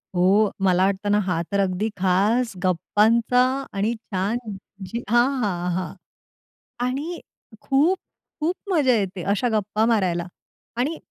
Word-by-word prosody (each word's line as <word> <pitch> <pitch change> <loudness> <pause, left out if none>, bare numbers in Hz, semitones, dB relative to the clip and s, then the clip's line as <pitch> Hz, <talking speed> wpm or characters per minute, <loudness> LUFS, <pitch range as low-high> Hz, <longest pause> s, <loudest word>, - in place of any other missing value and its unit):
हो. 195 +4 +4 0.2
मला 185 +1 +4
वाटतं 200 +1 -1
ना 205 - +4
हा, 180 -3 0
तर 200 - +1
अगदी 195 +2 0
खास 205 +6 +2
गप्पांचा 220 +7 +2 0.3
आणि 205 +4 0
छान 210 0 -2 0.5
जी 235 +1 -4
हां, 240 +2 +4 0.2
हां, 180 -3 -1
हां. 180 -3 -3 0.9
आणि 290 +7 -3 0.4
खूप, 310 +8 +2 0.4
खूप 325 +4 0 0.2
मजा 290 -8 +3
येते 190 -4 -2
अशा 245 +4 0
गप्पा 210 +2 0
मारायला. 185 -7 +1 0.5
आणि 290 +7 -1
210 Hz, 130 wpm, -23 LUFS, 185-240 Hz, 0.9 s, हो